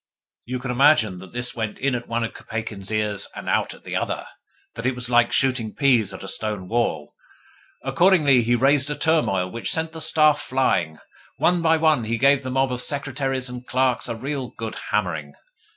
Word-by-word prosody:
You 125 +2 -3
can 125 0 -4
imagine 125 -8 +4
that 95 0 -12
this 125 0 -2
went 110 -3 -3
in 135 0 0
at 120 -1 -4
one 115 0 -1
of 115 - -4
Kopeikin's 110 -3 -6
ears, 105 -2 0
and - - -8
out - - 0
at - - -19
the - - -5
other; - - -2 0.5
that 115 +2 -3
it 130 - 0
was 125 0 -4
like 120 0 +4
shooting 125 -5 +1
peas 120 -8 +3
at 95 - -9
a - - -7
stone 100 -1 -2
wall. 90 -10 -1 0.7
Accordingly 155 -9 +4
he 120 +1 +2
raised 135 +2 +3
a 150 - -2
turmoil 140 - +1
which 115 - -4
sent 160 0 -1
the 160 -1 -7
staff 155 -1 +3
flying. 85 -12 0 0.4
One 175 -1 +2
by 165 0 +3
one, 155 -7 +2
he 115 +1 -1
gave 140 +2 +4
the 130 - -5
mob 135 0 +1
of 125 0 -2
secretaries 135 -2 -2
and 125 0 -8
clerks 130 -1 0
a 115 - -2
real 135 +2 -4
good 110 -1 -5 0.2
hammering. 80 -8 -2
125 Hz, 200 wpm, -23 LUFS, 110-140 Hz, 0.7 s, imagine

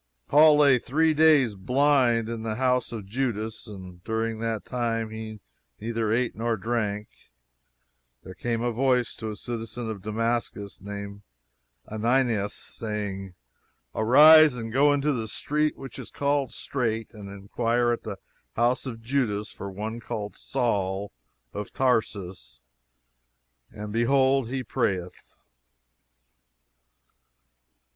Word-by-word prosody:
Paul 150 +1 +7
lay 140 -4 +5
three 155 +6 +2
days, 150 -7 +5
blind, 125 +2 +2
in 115 -1 -4
the 110 -1 -3
house 125 0 +1
of 110 -4 -6
Judas, 110 0 -3
and 90 -4 -10
during 110 +1 -2
that 115 -2 -3
time 115 -3 -2
he 110 -1 -7 0.4
neither 115 -1 -2
ate 120 +2 0
nor 115 0 -1
drank. 105 -1 -2 1.2
There 95 - -9
came 115 +3 -2
a 120 - +1
voice 125 0 +1
to 110 - -5
a 105 - -5
citizen 115 0 -5
of 100 -3 -7
Damascus, 110 -1 -2
named 100 0 -7 0.7
Ananias, 115 -1 +1
saying, 100 -4 -5 0.6
"Arise, 150 +5 +7
and 115 -2 -6
go 145 +3 +5
into 145 +1 +1
the 115 -3 -3
street 150 +7 -1
which 135 -3 -9
is - - -8
called 140 -1 0
Straight, 115 -4 -3
and 105 -3 -9
inquire 115 +5 0
at 120 - -2
the - - -6 0.4
house 120 +3 +1
of 115 -3 -7
Judas, 115 -5 -1
for 100 - -7
one 110 +4 -5
called 105 -2 -5
Saul, 100 -6 -1 0.4
of 105 0 -5
Tarsus; 95 - -1 1.1
for 105 - -7
behold, 130 +3 +2
he 130 0 -3
prayeth." 95 -8 -1
115 Hz, 125 wpm, -26 LUFS, 105-125 Hz, 1.2 s, Paul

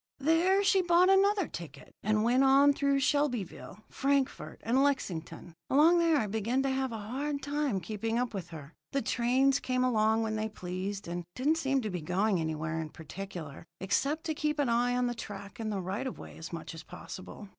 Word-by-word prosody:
There 335 +7 +3
she 390 -1 +4
bought 355 +1 +4
another 395 0 +4
ticket, 155 -5 -9
and 215 +1 +1
went 245 +3 +4
on 275 +2 +6
through 280 -1 +1
Shelbyville, 245 - -1
Frankfort, 275 -1 -1
and 250 +4 +2
Lexington. 175 - -2 0.2
Along 320 +5 +5
there 330 -2 +4
I 250 - +1
began 220 +5 0
to 270 - 0
have 265 -1 -1
a 225 - -4
hard 275 +7 -3
time 285 -7 0
keeping 220 +5 -3
up 245 -1 -1
with 185 -4 -5
her. 155 -2 -10 0.2
The 275 - 0
trains 260 +3 +2
came 255 0 0
along 220 -2 +2
when 220 -1 -2
they 215 0 -2
pleased, 190 0 -5
and 175 +1 -4
didn't 295 +5 +2
seem 270 -3 +1
to 215 -3 -3
be 180 -2 -3
going 185 +4 +1
anywhere 160 0 -2
in 155 - -5
particular, 160 -2 -8 0.2
except 280 - 0
to 320 - -1
keep 300 0 -1
on 245 -1 +2
the 240 - 0
track 205 -3 -8
and 220 -1 -2
the 200 - -2
right 190 +8 -3
of 255 - -6
way - - -10
as 160 - -8
much 165 -1 -6
as 165 - -8
possible. 190 +4 -10
235 Hz, 195 wpm, -30 LUFS, 195-280 Hz, 0.2 s, on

